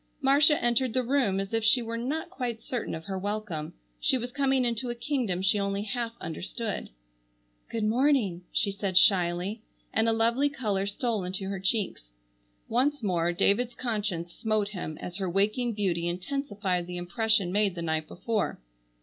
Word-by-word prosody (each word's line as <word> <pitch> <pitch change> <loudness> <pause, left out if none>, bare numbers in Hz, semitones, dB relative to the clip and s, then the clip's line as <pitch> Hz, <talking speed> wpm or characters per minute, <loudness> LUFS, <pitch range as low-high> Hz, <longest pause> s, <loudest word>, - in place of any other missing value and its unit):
Marcia 285 +2 +5
entered 240 0 +2
the 255 - +2
room 240 -7 +2
as 195 +2 -4
if 225 -1 +1
she 225 +3 +5
were 230 -1 -4
not 295 +9 -3
quite 245 -10 -3
certain 245 -1 -3
of 160 - -8
her 190 -1 -3
welcome. 205 -6 -3 0.2
She 260 - +3
was 245 0 -4
coming 270 -1 +2
into 240 +1 -1
a 240 - -2
kingdom 235 -8 -1
she 205 +2 +3
only 200 0 -1
half 230 +2 -2
understood. 185 +7 -4 0.8
"Good 225 -1 -2
morning," 220 -6 +2
she 200 - +1
said 195 -2 -1
shyly, 185 +2 +3 0.3
and 225 +1 +3
a - - +4
lovely 235 +5 +3
color 210 -8 -1
stole 215 0 -1
into 190 +2 -3
her 195 -1 -3
cheeks. 195 - -1 0.6
Once 265 +3 +1
more 175 -4 +1
David's 210 +7 +2
conscience 205 -8 -2
smote 215 -2 0
him 175 -6 -5
as 180 +1 -5
her 190 -2 -1
waking 215 +6 +1
beauty 180 -5 0
intensified 190 -2 -2
the 180 0 -5
impression 195 +2 +1
made 200 -1 +2
the 170 - -4
night 160 -1 -1
before. 220 +2 -2
215 Hz, 170 wpm, -28 LUFS, 185-240 Hz, 0.8 s, Marcia